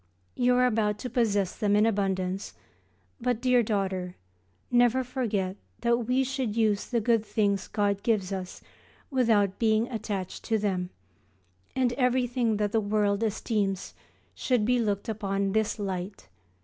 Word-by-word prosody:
You 250 0 +2
are 250 0 +4
about 215 -3 +1
to 250 +4 -6
possess 205 -6 +1
them 205 -1 +1
in 210 +1 +4
abundance, 195 -3 -1 0.6
but, 245 -1 0
dear 250 0 +4
daughter, 190 -4 -2 0.6
never 245 +1 +4
forget 215 -7 -2 0.2
that 235 -1 +1
we 255 +2 +2
should 260 -5 -2
use 215 -3 +1
the 240 - 0
good 230 0 +2
things 200 -3 0
God 200 -1 0
gives 205 -5 0
us 185 -1 -6 0.5
without 220 -7 +2
being 220 0 +2
attached 210 -5 -4
to 225 - +1
them, 190 -4 -1 0.9
and 255 -2 +2
everything 245 -3 +1
that 205 -1 0
the 225 - +2
world 205 0 +1
esteems 210 -3 -1 0.4
should 245 -5 +1
be 250 +2 +2
looked 205 -3 -1
upon 205 -3 -3
in 195 - 0
this 220 +1 0
light. 190 - -5
215 Hz, 150 wpm, -28 LUFS, 200-240 Hz, 0.9 s, are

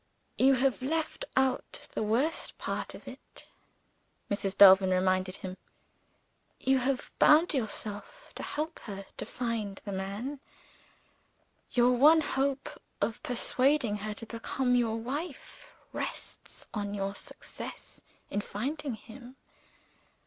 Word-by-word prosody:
"You 270 +1 +6
have 260 0 +1
left 315 +4 -1
out 265 -1 0
the - - -2
worst 235 +10 0
part - - -3
of - - -13
it," - - -12 0.9
Mrs. 200 -1 -1
Delvin 190 -1 +9
reminded 185 0 +2
him. 185 -1 -7 1.0
"You 265 0 +3
have 255 0 -1
bound 315 +3 +6
yourself 220 - -4
to - - -7
help 315 +2 -3
her 195 -2 -6
to - - -4
find 225 -5 -3
the 200 - -4
man. 200 +9 -4 1.3
Your 245 0 +5
one 305 +6 +7
hope 275 -1 -1 0.2
of 220 +3 -1
persuading 250 -2 +2
her 210 +1 -4
to 230 - -7
become 250 +3 -1
your 230 -2 +2
wife 275 +6 -6 0.2
rests - - -5
on 205 -1 -2
your 195 0 -2
success - - -6 0.3
in 205 - 0
finding 275 +6 -3
him. 240 +4 -12
240 Hz, 120 wpm, -30 LUFS, 205-270 Hz, 1.3 s, Delvin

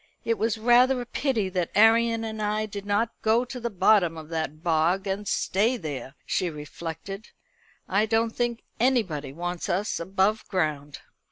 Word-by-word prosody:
"It 230 -1 0
was 225 0 0
rather 245 +3 +4
a 245 - -4
pity 240 -5 -1
that 180 -2 -1
Arion 225 +1 +4
and 220 -1 -4
I 210 +1 0
did 205 -1 -7
not 210 +3 +1
go 225 +3 +3
to 250 0 -7
the 235 0 -2
bottom 190 -4 +3
of 155 -1 -9
that 160 -1 -4
bog 170 +4 +2
and 200 +1 -3
stay 220 +8 +1
there," 145 - -6
she 180 - 0
reflected. 165 +6 -7 0.6
"I 200 +3 +2
don't 225 +1 +1
think 240 -1 -1 0.2
anybody 210 - +1
wants 175 +3 -4
us 200 +5 -1
above 190 +5 0
ground." 150 -6 -2
205 Hz, 165 wpm, -26 LUFS, 170-225 Hz, 0.6 s, rather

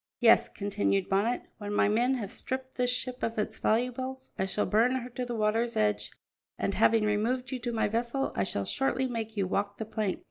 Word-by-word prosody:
"Yes," - - +6
continued 200 -1 0
Bonnet, 210 +5 +1 0.2
"when 205 -1 -4
my - - +4
men 240 +5 +3
have 215 -5 -4
stripped 260 0 -4
this 250 -1 +1
ship 250 0 -2
of 225 0 -2
its 210 - -2
valuables 255 +3 -1
I 190 - 0
shall 200 +2 -1
burn 230 +4 +3
her 250 -1 -3
to 250 +1 -3
the 240 -1 -4
water's 225 +2 +1
edge, 210 -1 +1 0.5
and, - - -1
having 225 -2 +4
removed 235 +6 0
you 260 - -2
to 240 0 -3
my 225 - +1
vessel, 235 +5 -1
I 100 - +1
shall 100 +1 -2
shortly 265 - 0
make 225 -3 -4
you 195 - +2
walk 200 +2 -1
the 220 - -4
plank." 215 -3 -2
225 Hz, 210 wpm, -29 LUFS, 210-250 Hz, 0.5 s, Yes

